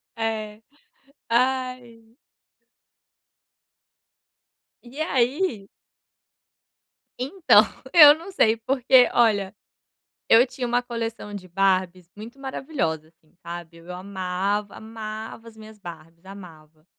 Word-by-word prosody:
É. 220 -1 -4 0.7
Ai. 245 -2 -2 2.7
E 260 +5 -9
aí 260 - -1 1.5
então 275 - +4 0.3
eu 300 -4 +10
não 340 +5 -11
sei 225 - +2
porque, 255 +1 +3
olha, 205 -5 +2 0.8
eu 230 +3 +7
tinha 250 -1 -5
uma 245 +1 +1
coleção 230 -3 -5
de 190 -2 -8
Barbies 185 -1 0
muito 230 +6 -11
maravilhosa 265 - -3
assim, 160 -2 -34
sabe. 170 -1 -8
Eu 170 +2 -10
amava, 195 +2 -3
amava 220 0 -8
as 225 - -14
minhas 215 -1 -13
Barbies, 170 -1 -12
amava. 160 -5 -14
220 Hz, 95 wpm, -24 LUFS, 185-245 Hz, 2.7 s, eu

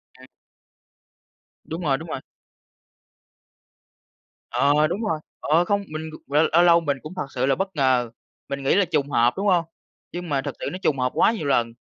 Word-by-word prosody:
Ừm. 130 0 -16 1.4
Đúng 165 +3 -6
rồi, 140 -5 +1
đúng 160 +3 -9
rồi. 145 - -3 2.3
Ờ, 145 +2 +3
đúng 180 +7 -3
rồi, 160 -8 -1 0.2
ờ, 165 +4 +2
không 200 +2 0
mình 155 +1 -6 0.2
c - - -21
ờ, 150 +2 +4
lâu 170 +1 +6
lâu 170 -1 +6
mình 145 -4 -1
cũng 155 +4 -8
thật 185 - -3
sự 125 +1 +1
là 135 - +2
bất 190 +2 -3
ngờ. 130 -4 +2 0.4
Mình 140 0 -4
nghĩ 135 - +3
là 200 -1 +4
trùng 140 -3 -1
hợp, 120 -2 +3
đúng 200 +2 -1
không? 175 -3 +3 0.5
Nhưng 175 -1 -6
mà 140 -2 +1
thực - - -5
sự - - -4
nó 180 - -5
trùng 140 -3 +1
hợp 125 0 +1
quá - - +4
nhiều 205 -11 -4
lần. 120 -4 +1
155 Hz, 195 wpm, -23 LUFS, 135-175 Hz, 2.3 s, lâu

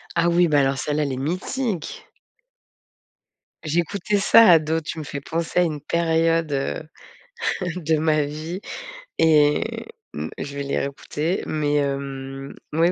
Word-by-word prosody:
Ah 170 0 +3
oui, 175 +1 +4
beh, 150 -2 +3
alors 135 0 +2
celle-là, 150 +2 0
elle 140 - -2
est 130 - -3
mythique! 185 - -3 1.6
J'écoutais 175 +6 0
ça 225 +2 +7
ado. 160 0 +3
Tu 160 - -6
me 155 - -4
fais 140 0 -5
penser 165 +3 -1
à - - +5
une 155 -4 -2
période, 165 -1 +1
heu, 140 +3 -2 0.9
de 160 -2 +1
ma 155 -1 +2
vie 155 +5 -5 0.6
et 150 -2 +4 0.5
mmh, 75 +1 -4
je 140 0 -6
vais 140 - -2
les 140 - -1
réécouter 150 +5 -2
mais 150 -1 0
hem, 135 -1 -3 0.2
mais 165 +3 +3
155 Hz, 145 wpm, -23 LUFS, 140-170 Hz, 1.6 s, ça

